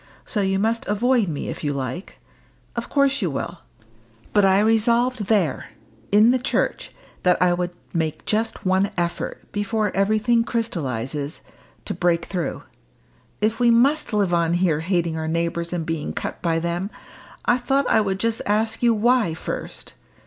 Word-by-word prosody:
So 210 - -1
you 195 0 +1
must 225 +3 0
avoid 230 +1 +2
me 150 -4 -4
if - - -6
you 145 -1 0
like. 135 +6 -5 0.6
Of 235 0 -4
course 280 -2 +2
you 185 - +1
will. 170 +5 -4 0.7
But 205 - +4
I 190 0 +5
resolved 230 +2 +2
there 190 - +1 0.4
in 215 +4 +6
the 255 - +2
church 250 - -1 0.3
that 180 -1 +3
I 180 -1 +4
would 175 0 -1 0.2
make 160 -2 -2
just 220 -1 -1
one 190 +2 +2
effort, 170 0 -3
before 210 +1 -1
everything 215 +4 +2
crystallises, 145 - -3 0.4
to - - -2
break 175 -1 +1
through. 180 -4 -3 0.8
If 220 +2 +1
we 240 -1 +4
must 265 +7 +3
live 200 -4 +1
on 170 0 +2
here 175 -4 +2
hating 170 -1 0
our 160 0 -3
neighbours 170 +1 -1
and 170 -2 -2
being 160 -2 -3
cut - - -5
by 165 -2 +1
them, 170 +3 -2 0.6
I 245 - +3
thought 270 +2 +1
I 220 - +4
would 195 -2 -1
just 230 +1 0
ask 220 +2 0
you 235 -2 +4
why, 220 -5 +2
first. - - -6
195 Hz, 165 wpm, -23 LUFS, 170-230 Hz, 0.8 s, in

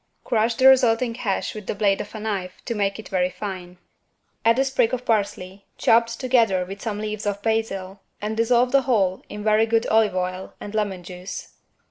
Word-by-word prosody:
Crush 230 0 +1
the 260 - +1
resulting 245 -2 +4
hash 225 -5 -2
with 210 -2 -9
the - - -2
blade 200 -1 +2
of 205 - -9
a - - -5
knife 195 -4 -3
to 235 - -2
make 200 -2 -1
it 220 - -9
very 180 -2 +1
fine. 180 -1 -7 0.7
Add 230 +1 +4
a 270 - +3
sprig 260 -2 +1
of 250 0 -9
parsley, 200 -3 -1
chopped 230 0 +3
together 230 -8 +2
with 195 +2 -9
some 215 -3 -3
leaves 210 0 -4
of 200 0 -2
basil 200 -4 -2 0.2
and 215 +1 -3
dissolve 240 +2 +3
the 275 - +5
whole 205 -8 +1
in 210 0 -7
very 215 +1 +3
good 225 0 +2
olive 220 -3 +3
oil 185 +1 -3
and 205 - -8
lemon 200 -4 -2
juice. 180 +2 -8
215 Hz, 195 wpm, -23 LUFS, 195-230 Hz, 0.7 s, the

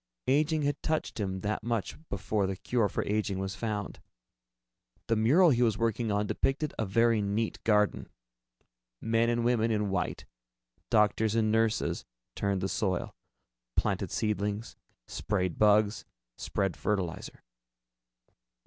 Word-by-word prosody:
Aging 150 +3 +2
had 145 0 -1
touched 155 -6 -2
him 95 -2 -2
that 105 +2 -2
much 115 -2 -2
before 100 +1 -1
the 95 - -2
cure 105 +3 0
for - - -2
aging 105 -2 -1
was 95 0 -3
found. 105 -3 -4 1.1
The 115 - +1
mural 150 +11 +5
he 120 -2 +2
was 115 -3 +3
working 115 -1 0
on 105 +1 +1
depicted 140 +7 -1
a 110 - 0
very 115 +2 +3
neat 105 +2 -2
garden. 105 -2 +2 0.9
Men 115 +1 +1
and 120 0 0
women 115 -2 +2
in 105 -3 0
white, 95 -2 -2 0.6
doctors 110 0 +3
and 110 -1 +2
nurses, 110 0 +1 0.3
turned 100 -2 -1
the 95 - 0
soil, 95 -3 -2 0.6
planted - - 0
seedlings, 105 0 -2 0.3
sprayed 95 -5 -2
bugs, 105 0 +4 0.3
spread 95 +4 -2
fertilizer. 95 -5 -3
110 Hz, 130 wpm, -29 LUFS, 100-115 Hz, 1.1 s, mural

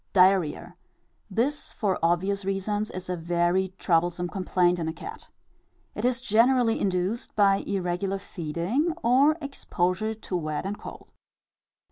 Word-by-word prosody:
Diarrhœa. 180 -3 +3 0.6
This, 250 +9 -1
for 200 -4 -1
obvious 190 +4 +1
reasons, 200 +2 -1
is 185 0 -7
a 180 - -1
very 175 +2 0
troublesome 175 0 +1
complaint 180 -2 +1
in 165 - -2
a 160 - -2
cat. 170 - -9 0.6
It 210 - -3
is 250 -1 +2
generally 240 0 +3
induced 190 +4 -1
by 200 -2 +5
irregular 190 0 -2
feeding, 190 - -2
or 275 +6 +4
exposure 215 -5 -1
to 210 -3 -6
wet 155 -1 -2
and 200 +1 -4
cold. - - -10
190 Hz, 130 wpm, -26 LUFS, 175-215 Hz, 0.6 s, by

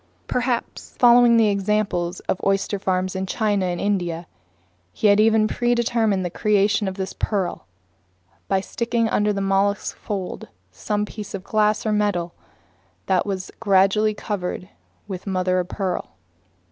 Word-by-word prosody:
Perhaps, 245 -1 -3
following 240 -1 +6
the 220 -2 +4
examples 195 -3 -1
of 185 - -3
oyster 195 +1 0
farmers 185 -1 -1
in 190 0 -2
China 205 -2 0
and 175 -1 -2
India, 175 -4 -1 0.7
he - - -4
had 205 0 +6
even 220 0 +4
predetermined 230 -5 +1
the 175 - -3
creation 205 +1 +2
of 190 - -3
this 190 -1 -4
pearl 195 -4 -2 0.8
by 195 -1 +1
sticking 235 +2 -1
under 210 -1 +1
the 200 -1 -2
mollusk's 195 +1 +1
folds 195 -3 -5 0.3
some 210 -2 -2
piece 210 -1 -7
of 190 - -7
glass 215 +1 +1
or 215 - +1
metal 205 -5 0 0.7
that 190 +1 +1
was 190 -2 -4
gradually 205 +1 +3
covered 190 -3 -4 0.4
with 190 -1 -7
mother 185 -1 +1
of 180 - -2
pearl. 190 - -4
200 Hz, 145 wpm, -22 LUFS, 190-215 Hz, 0.8 s, following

